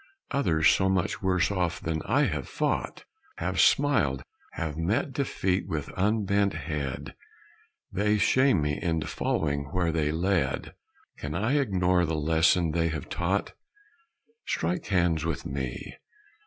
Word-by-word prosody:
Others 80 - +3
so 95 0 +3
much 95 -2 0
worse 90 -1 +2
off 90 -6 -1
than 80 -1 -2
I - - +3
have - - -2
fought; - - -2 0.3
Have - - 0
smiled 105 - +3 0.3
have 80 -3 -3
met 95 - -1
defeat 95 -8 -1
with 75 -3 -3
unbent 100 0 +1
head 70 -2 -4 0.8
They 105 +2 +1
shame 130 - +3
me 75 0 -1
into 80 -3 -1
following 70 -2 -1
where 85 +3 -1
they 75 -2 0
led. 85 -4 0 0.5
Can 75 +2 -4
I 120 +11 +1
ignore 90 -7 +2
the 80 - -1
lesson 80 +2 +3
they 85 +1 +1
have 80 -1 -4
taught? 95 +4 -1 0.9
Strike 85 +2 -1
hands 85 -5 +2
with 80 -2 -3
me! 65 -3 -5
85 Hz, 135 wpm, -27 LUFS, 80-95 Hz, 0.9 s, Others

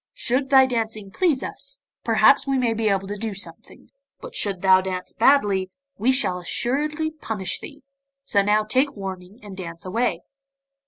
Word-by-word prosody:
Should 265 +2 0
thy 265 -1 +7
dancing 220 -5 -3
please 315 - +1
us, 280 0 -6 0.3
perhaps 225 +4 +4
we 270 -1 +1
may 240 -3 +1
be 225 -1 0
able 195 -1 0
to 205 0 -5
do 220 -2 -3
something; 195 - -8 0.3
but - - -10
shouldst 195 -3 -1
thou 190 -1 +6
dance 185 -1 -5
badly, 205 -7 +3 0.3
we 235 +6 +2
shall 185 -9 +1
assuredly 300 - -2
punish 220 - -4
thee, 290 -3 -11 0.4
so 205 -7 +2
now 210 +2 +2
take 260 +7 +1
warning 190 +1 -7
and 205 -2 -9
dance 170 -2 -7
away. 230 +7 -1
220 Hz, 165 wpm, -23 LUFS, 195-265 Hz, 0.4 s, thy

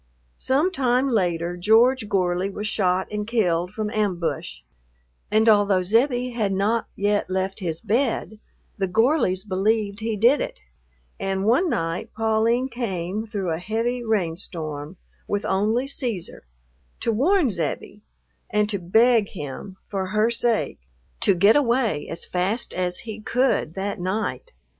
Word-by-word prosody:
Some 295 +8 +1
time 260 -4 +1
later 175 -6 0
George 220 +5 +3
Gorley 180 0 +1
was 210 +2 -4
shot 190 -3 +1
and 210 0 -3
killed 180 -7 +1
from 210 0 -3
ambush, 180 - -2 0.7
and 220 +2 +3
although 205 -3 +4
Zebbie 245 +5 +1
had 215 -5 -1
not 215 +4 0
yet 205 0 0
left 190 +1 -2
his 165 -4 -3
bed 225 -1 -1 0.4
the 195 - +1
Gorleys 220 - +2
believed 205 +1 0
he 220 0 -2
did 240 +7 +4
it, - - -4 0.6
and 195 0 -1
one 260 - +3
night 165 - -2
Pauline 225 +3 +1
came 215 -4 -3
through 195 -5 -3
a 160 - -2
heavy 230 +5 -2
rainstorm, 165 -6 -3 0.3
with 205 0 -1
only 215 +6 +1
Cæsar, 240 - -4 0.6
to 230 - +1
warn 290 - +3
Zebbie 170 -4 -4 0.5
and 210 0 +2
to 200 - -1
beg 220 +4 +3
him, 180 +3 -7
for 190 -2 -3
her 215 +3 +2
sake, 235 -1 0 0.4
to 195 - +3
get 200 +5 +5
away 235 - +1
as 165 - -5
fast 190 +7 -1
as 180 -1 -2
he 220 -1 -6
could 245 - 0
that 195 0 -3
night. 210 - -3
210 Hz, 140 wpm, -23 LUFS, 185-235 Hz, 0.7 s, get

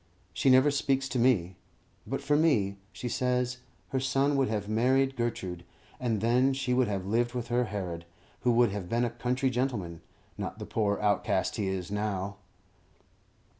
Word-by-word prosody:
She 135 - +2
never 130 +3 +6
speaks 135 -1 +1
to 125 - -1
me. 95 -8 +2 0.5
But 135 +4 -3
for 145 +1 +2
me, 115 -11 +2
she 120 - -6
says, 125 0 0 0.3
her 130 - 0
son 135 +2 +1
would 135 -1 +2
have 105 -2 -2
married 130 +5 +2
Gertrude, 95 -8 -3 0.4
and 115 -5 -1
then 125 +4 +3
she 130 -2 -1
would 125 -1 +3
have 100 -3 -2
lived 120 +4 0
with 120 -1 -3
her 120 +1 +2
Herod, 90 -6 -5 0.3
who 125 - +2
would 120 -2 +4
have 100 -3 -5
been 120 +1 +1
a 120 - -2
country 125 +3 0
gentleman, 110 -10 -2 0.4
not - - -4
the - - -6
poor 105 -2 0
outcast 105 -2 +1
he 100 - -1
is 95 -1 -3
now. 100 -1 -2
120 Hz, 170 wpm, -29 LUFS, 100-130 Hz, 0.5 s, never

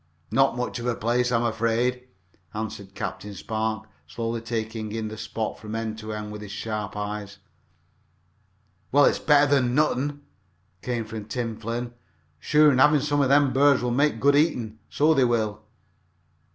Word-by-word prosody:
"Not 135 -2 +3
much 125 0 -3
of 120 - -4
a 120 - +1
place, 120 +2 0
I - - +2
am 115 - 0
afraid," 120 +2 0 0.5
answered 100 -2 -6
Captain 105 -1 -5
Spark, 110 +1 -3 0.2
slowly 115 +6 -3
taking 110 -1 -4
in 110 0 -3
the 110 - -7
spot 110 0 -4
from 110 +1 -6
end 110 -1 -3
to 110 0 -6
end 105 0 -5
with 105 0 -7
his 105 -2 -8
sharp 105 -1 -4
eyes. 105 -1 -5 1.5
"Well, 145 +1 +6
it's - - +2
better 145 -2 +4
nor 130 +5 +2
nuthin," 145 +3 -3 0.6
came 120 -2 -2
from 110 -1 -7
Tim 115 0 -3
Flynn. 120 +2 -4 0.5
"Sure, 150 - +5
an' 150 +3 +5
some 145 0 +1
av 135 - +2
thim 140 -2 +4
burds 140 -1 +4
will 125 - 0
make 140 -1 +2
good 140 +3 +4
eatin', 120 -8 +1
so 155 +2 +3
they 135 -4 +3
will!" 110 -3 0
115 Hz, 165 wpm, -25 LUFS, 110-135 Hz, 1.5 s, Well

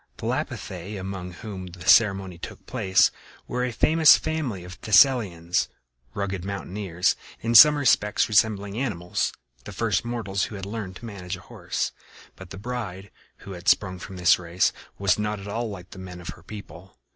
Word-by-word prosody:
The - - -7
Lapithæ, 95 +3 -4
among 95 -1 -6
whom 95 0 -7
the 90 0 -11
ceremony 95 -5 +4
took - - -9
place, 95 0 +3 0.4
were 125 0 -2
a 125 - -1
famous 155 +6 +6
family 145 - -3
of 90 +1 -11
Thessalians, 95 -7 +3 0.5
rugged 95 -3 -3
mountaineers, 95 -2 -1 0.3
in 115 +1 -1
some 150 +6 +10
respects 115 -7 +2
resembling 105 -1 +1
animals 90 -10 -1 0.3
the - - -8
first - - 0
mortals 110 -5 -2
who 110 - -8
had 95 -1 -6
learned 100 -3 -5
to 120 - -10
manage 95 -4 -6
a - - -14
horse. - - -3 0.4
But 95 -2 -12
the - - -8
bride, 100 -4 -6 0.3
who 100 - -8
had 90 -2 -9
sprung 95 -3 +2
from 95 +1 -9
this 90 0 +4
race, 90 +1 +1 0.2
was 100 0 +2
not 105 0 -2
at 100 - -9
all 115 +3 -3
like 95 -2 -9
the 95 - -10
men 90 -1 -8
of 85 - -8
her - - -9
people. 95 -3 -11
100 Hz, 175 wpm, -25 LUFS, 90-110 Hz, 0.5 s, some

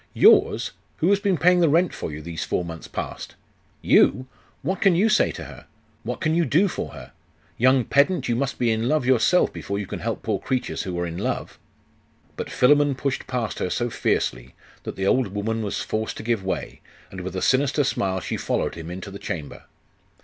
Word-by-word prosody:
'Yours? - - +5 0.3
Who 175 +5 +2
has 200 - +4
been 200 -3 +1
paying 180 +3 +4
the 170 -3 +4
rent 170 +4 +3
for - - -5
you, 75 +1 -7
these 85 0 -4
four 90 - -1
months 80 -1 -8
past? - - -6 0.5
You! 130 - +4 0.4
What 185 +6 -2
can 195 -3 +5
you 205 +6 +3
say 215 - +3
to - - -7
her? - - -12 0.3
What - - -5
can 155 0 +1
you 170 +1 +3
do 165 +7 +3
for - - -5
her? - - -11 0.5
Young 130 0 +4
pedant, 145 +7 +2
you 120 - +1
must 135 +2 -2
be 120 -2 +2
in 110 +2 0
love 155 -4 +1
yourself 130 +8 +3
before 100 - -4
you 100 - -3
can - - -6
help 115 +1 -3
poor 105 -4 -1
creatures 130 -2 -2
who 90 -2 -4
are 90 - -1
in 85 0 -5
love!' - - -3 0.8
But - - -5
Philammon 145 +2 +4
pushed 140 0 -3
past 120 -6 -3
her - - -1
so 120 +5 -1
fiercely, - - -1 0.3
that - - -5
the 95 - -2
old 125 +4 +3
woman 105 +3 -2
was 105 -2 -3
forced 110 0 -3
to - - -7
give 115 -3 0
way, 95 - -4 0.3
and 95 - -7
with 95 +1 -6
a 95 - -2
sinister 140 +2 +2
smile 95 -7 -1
she - - -3
followed - - -1
him 80 0 -8
into 95 +3 -7
the 100 - -8
chamber. 75 -5 -6
120 Hz, 210 wpm, -24 LUFS, 95-145 Hz, 0.8 s, Yours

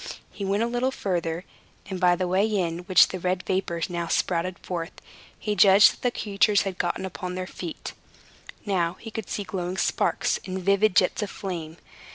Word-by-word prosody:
He 200 - -7
went 200 +3 +1
a - - +1
little 245 +2 0
farther, 175 -8 -2 0.4
and 190 -1 -4
by 180 -1 +4
the 185 +1 -1
way 190 +4 +2
in 175 -6 -1
which 185 - +6
the 185 - -5
red 180 +1 -1
vapor 175 -3 -1
now 170 -2 -3
spouted 180 +2 0
forth, 170 -2 -5 0.4
he 210 -1 -2
judged 195 +2 +7
that - - -15
the 250 - +2
creatures 205 0 +3
had 195 -2 -5
got 175 - 0
upon 180 -1 -5
their 185 0 -3
feet. 175 -2 -7 0.7
Now 175 -4 +1
he 225 - -10
could 220 -1 -6
see 205 - -2
glowing 185 -1 -4
sparks, - - +1
and 185 0 -3
vivid 200 +1 +2
jets 185 - +3
of 210 - -2
flame. 170 -5 -6
185 Hz, 190 wpm, -25 LUFS, 175-200 Hz, 0.7 s, judged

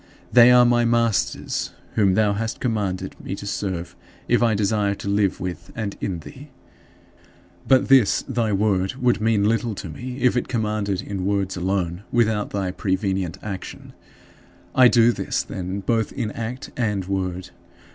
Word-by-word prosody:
They 120 0 +8
are 125 0 +7
my 120 0 +3
masters, 115 -2 0 0.2
whom 100 -3 +3
thou 105 -1 +3
hast 110 +2 -3
commanded 105 -6 -2
me 95 - -4
to 100 - -9
serve 90 -4 -4 0.3
if 120 - +3
I 115 -2 +3
desire 100 0 +1
to 100 - -8
live 100 -1 +1
with 90 -1 -6
and 105 -3 -4
in 90 -5 -3
thee. 140 - -12 1.2
But 130 -1 +4
this 130 -6 +4
thy 120 -5 -1
Word 95 -1 +1
would 125 -3 +1
mean 110 -2 +2
little 115 0 0
to 90 - -7
me 125 +10 -7
if 125 0 +3
it 125 - 0
commanded 105 -5 -1
in 95 -2 -4
words 100 -2 0
alone, 90 -1 -1
without 110 -3 +1
thy 95 -2 -2
prevenient 95 -2 -1
action. 100 -3 -7 0.8
I 130 -1 +7
do 120 -1 +5
this, - - -2
then, 95 +1 -5
both 115 +1 0
in 115 -5 -3
act 115 +4 -6
and 105 -6 -1
word. 95 -1 -3
105 Hz, 160 wpm, -23 LUFS, 95-115 Hz, 1.2 s, They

